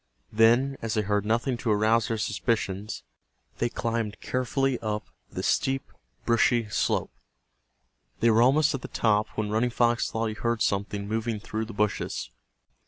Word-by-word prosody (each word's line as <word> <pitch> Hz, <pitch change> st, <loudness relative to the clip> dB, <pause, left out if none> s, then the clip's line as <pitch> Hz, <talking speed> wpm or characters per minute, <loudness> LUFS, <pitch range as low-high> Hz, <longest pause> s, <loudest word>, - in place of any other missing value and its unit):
Then, 120 Hz, +5 st, +4 dB
as 115 Hz, 0 st, -2 dB
they 110 Hz, -, +1 dB
heard 105 Hz, 0 st, 0 dB
nothing 120 Hz, +3 st, +1 dB
to 115 Hz, -, -3 dB
arouse 110 Hz, +2 st, +3 dB
their 115 Hz, -, -1 dB
suspicions, 105 Hz, -1 st, -2 dB, 0.6 s
they 120 Hz, -, +1 dB
climbed 115 Hz, -3 st, -2 dB
carefully 130 Hz, +1 st, 0 dB
up 105 Hz, -1 st, -3 dB, 0.2 s
the -, -, -5 dB
steep 135 Hz, 0 st, 0 dB, 0.3 s
brushy 115 Hz, -1 st, +3 dB
slope. -, -, 0 dB, 1.1 s
They 115 Hz, +1 st, +4 dB
were 110 Hz, +1 st, +4 dB
almost 145 Hz, +5 st, +4 dB
at 135 Hz, -, -3 dB
the -, -, -6 dB
top 105 Hz, -1 st, +1 dB
when 105 Hz, -1 st, -1 dB
Running 115 Hz, +3 st, +2 dB
Fox 120 Hz, 0 st, +1 dB
thought 115 Hz, +1 st, -2 dB
he 110 Hz, -, -2 dB
heard 115 Hz, +1 st, -1 dB
something 100 Hz, 0 st, -1 dB
moving 110 Hz, 0 st, -2 dB
through 110 Hz, +1 st, -4 dB
the 115 Hz, -, -9 dB
bushes. 105 Hz, 0 st, -2 dB
115 Hz, 160 wpm, -27 LUFS, 105-120 Hz, 1.1 s, Then